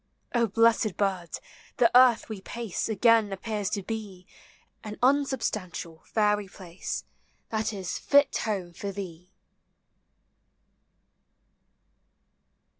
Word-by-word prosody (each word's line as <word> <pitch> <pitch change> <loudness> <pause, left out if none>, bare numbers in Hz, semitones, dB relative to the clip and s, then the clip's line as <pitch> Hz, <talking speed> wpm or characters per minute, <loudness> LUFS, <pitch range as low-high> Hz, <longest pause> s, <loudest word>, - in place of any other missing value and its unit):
O 235 -2 +3
blessed 225 -2 +3
bird! 185 -5 -1 0.4
the 235 -2 +4
earth 250 -2 +6
\vc 210 -4 -7
pace 230 -2 -4
Again 220 0 +4
appears 205 0 -3
t<> 200 - -2
be 205 -5 -6 0.6
An 210 0 -7
unsubstantial, 225 - 0
fairy 210 -2 +1
place; 180 -1 -6 0.5
That 220 0 -1
is 190 -4 -4
fit 285 -1 +4
home 190 -5 -3
for 200 +4 -5
thee! 180 -3 -8
210 Hz, 100 wpm, -27 LUFS, 185-230 Hz, 0.6 s, earth